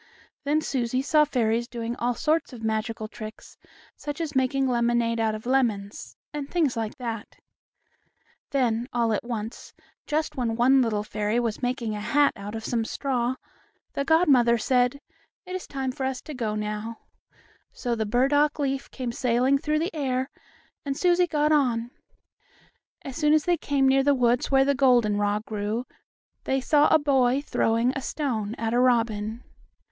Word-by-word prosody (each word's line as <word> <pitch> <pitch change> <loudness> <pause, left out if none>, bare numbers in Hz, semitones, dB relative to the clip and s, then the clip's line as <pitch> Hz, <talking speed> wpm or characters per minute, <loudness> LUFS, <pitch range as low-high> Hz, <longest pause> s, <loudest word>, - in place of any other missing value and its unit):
Then 300 +2 +2
Susie 255 -3 -1
saw 300 +1 +4
fairies 235 -4 0
doing 235 -1 -4
all 240 0 0
sorts 310 0 0
of 230 -2 -9
magical 220 0 -2
tricks, 215 0 -10 0.4
such 290 +1 -6
as 320 -4 -4
making 265 +1 +2
lemonade 235 -1 +1
out 220 -1 +1
of 215 - -9
lemons, 230 -6 -1 0.2
and 290 -1 -5
things 315 -8 +1
like 225 +3 -3
that. 230 -4 -5 1.1
Then, 245 -3 0
all 235 -2 +1
at 210 - -1
once, 230 -2 -6 0.3
just 310 +1 -1
when 235 -3 -1
one 260 +3 +5
little 215 -4 0
fairy 210 +2 -1
was 230 -1 -2
making 245 -3 -2
a 210 - -4
hat 285 +6 +3
out 205 +1 -7
of 220 0 -6
some 235 -2 0
straw, 250 0 -1 0.6
the 280 - -1
godmother 275 -7 +4
said: 250 +3 +1 0.5
"It 365 0 -5
is 370 - -6
time 265 -2 -3
for 265 - -6
us 260 -1 -3
to 305 - -7
go 225 -5 -2
now," 210 +2 -4 0.7
so 245 - -3
the 220 -2 -1
burdock 275 +6 +2
leaf 275 -2 -2
came 255 -3 -4
sailing 250 +3 +2
through 305 +2 0
the 330 +4 -2
air, 265 -3 -1 0.5
and 275 -1 -3
Susie 355 0 +3
got 300 -1 +1
on. 245 -5 +1 1.1
As 275 0 -6 0.2
they 355 - +2
came 285 -4 +1
near 270 +1 +4
the 285 +1 +3
woods 245 -1 +2
where 270 0 +4
the 280 - +3
goldenrod 215 -6 +2
grew 215 +3 -3 0.6
they 270 - +1
saw 290 +3 +4
a - - +5
boy 270 -2 +2
throwing 230 0 +1
a 270 - -4
stone 230 -7 -2
at 225 -1 -2
a 240 - +3
robin. 230 -2 +1
245 Hz, 165 wpm, -26 LUFS, 225-275 Hz, 1.1 s, one